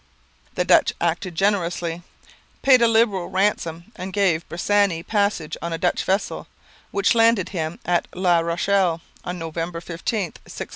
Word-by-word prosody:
The -, -, 0 dB
Dutch -, -, +4 dB
acted 170 Hz, +1 st, -1 dB
generously; 175 Hz, -3 st, 0 dB, 0.6 s
paid 260 Hz, -3 st, +6 dB
a 235 Hz, -, +6 dB
liberal 220 Hz, -5 st, +2 dB
ransom; 185 Hz, -2 st, -1 dB
and 185 Hz, +1 st, -6 dB
gave 185 Hz, -5 st, +1 dB
Bressani 185 Hz, -1 st, +1 dB
passage 200 Hz, -7 st, 0 dB
on 170 Hz, 0 st, -3 dB
a -, -, -2 dB
Dutch 175 Hz, +1 st, 0 dB
vessel, 190 Hz, +2 st, -1 dB, 0.4 s
which 395 Hz, -, +2 dB
landed 230 Hz, -4 st, +3 dB
him 160 Hz, -3 st, -4 dB
at 175 Hz, -1 st, +1 dB
La 180 Hz, -2 st, +3 dB
Rochelle 170 Hz, +1 st, +1 dB, 0.2 s
on 180 Hz, 0 st, -4 dB
November 165 Hz, +1 st, -4 dB
15, 170 Hz, 0 st, -8 dB, 0.2 s
1644. 175 Hz, -, -7 dB
180 Hz, 145 wpm, -22 LUFS, 170-200 Hz, 0.6 s, paid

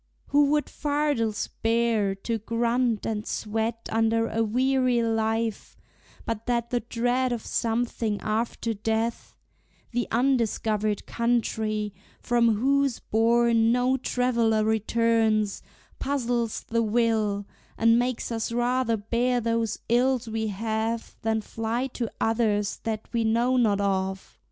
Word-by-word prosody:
who 290 Hz, +1 st, +5 dB
would 295 Hz, +1 st, +2 dB
fardels 290 Hz, -7 st, -1 dB
bear, 225 Hz, -3 st, +2 dB
To 225 Hz, +3 st, -3 dB
grunt 230 Hz, +1 st, 0 dB
and 210 Hz, -1 st, -2 dB
sweat 225 Hz, +2 st, -3 dB
under 225 Hz, 0 st, +2 dB
a 225 Hz, -, -1 dB
weary 250 Hz, +1 st, +2 dB
life, 225 Hz, -1 st, -1 dB, 0.5 s
But 230 Hz, 0 st, -4 dB
that 235 Hz, -1 st, 0 dB
the 245 Hz, -, +1 dB
dread 245 Hz, +2 st, 0 dB
of 235 Hz, -2 st, -3 dB
something 225 Hz, -2 st, -1 dB
after 225 Hz, +1 st, -1 dB
death, 225 Hz, +2 st, -2 dB, 0.6 s
The 240 Hz, -1 st, -1 dB
undiscovered 220 Hz, -4 st, 0 dB
country, 220 Hz, -3 st, -1 dB, 0.3 s
from 235 Hz, -2 st, +2 dB
whose 275 Hz, +3 st, +2 dB
bourn 230 Hz, 0 st, +3 dB
No 250 Hz, +2 st, +2 dB
traveller 235 Hz, -4 st, +1 dB
returns, 220 Hz, -1 st, +1 dB, 0.4 s
puzzles 240 Hz, -4 st, -1 dB
the 230 Hz, 0 st, 0 dB
will, 220 Hz, -2 st, +1 dB, 0.3 s
And 230 Hz, +1 st, +4 dB
makes 245 Hz, -1 st, -2 dB
us 225 Hz, 0 st, -2 dB
rather 240 Hz, 0 st, +1 dB
bear 240 Hz, +4 st, 0 dB
those 230 Hz, -2 st, -1 dB
ills 245 Hz, 0 st, +2 dB
we 220 Hz, 0 st, -2 dB
have, 220 Hz, +2 st, -2 dB
Than 220 Hz, 0 st, 0 dB
fly 225 Hz, +4 st, -2 dB
to 235 Hz, -3 st, -2 dB
others 215 Hz, -3 st, +1 dB
that 220 Hz, -1 st, -3 dB
we 230 Hz, -1 st, +1 dB
know 235 Hz, +3 st, +2 dB
not 215 Hz, -5 st, +3 dB
of? 190 Hz, -1 st, -2 dB
230 Hz, 120 wpm, -26 LUFS, 220-240 Hz, 0.6 s, who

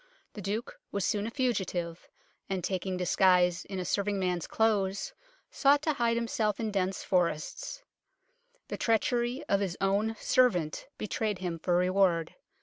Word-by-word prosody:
The 210 Hz, -, -7 dB
Duke 205 Hz, +5 st, -4 dB
was 200 Hz, -2 st, -1 dB
soon 205 Hz, 0 st, 0 dB
a -, -, -2 dB
fugitive, 190 Hz, -10 st, -2 dB, 0.4 s
and 190 Hz, -2 st, -2 dB
taking 185 Hz, 0 st, -2 dB
disguise 180 Hz, -1 st, +3 dB
in 195 Hz, -, -6 dB
a 180 Hz, -, -3 dB
serving 200 Hz, +1 st, 0 dB
man's 180 Hz, -3 st, -1 dB
clothes 200 Hz, -3 st, +1 dB, 0.4 s
sought 285 Hz, +1 st, +4 dB
to 310 Hz, -, +2 dB
hide 235 Hz, -3 st, +1 dB
himself 220 Hz, -3 st, 0 dB
in 220 Hz, -2 st, -1 dB
dense 190 Hz, -1 st, -1 dB
forests. 180 Hz, -, -1 dB, 0.9 s
The -, -, -3 dB
treachery 240 Hz, +4 st, +1 dB
of 200 Hz, -, +3 dB
his 190 Hz, -3 st, -2 dB
own 205 Hz, +3 st, +1 dB
servant 180 Hz, -12 st, +2 dB
betrayed 215 Hz, -1 st, -2 dB
him 175 Hz, -2 st, -4 dB
for 175 Hz, +1 st, +1 dB
reward. 180 Hz, -2 st, +2 dB
195 Hz, 145 wpm, -30 LUFS, 180-225 Hz, 0.9 s, sought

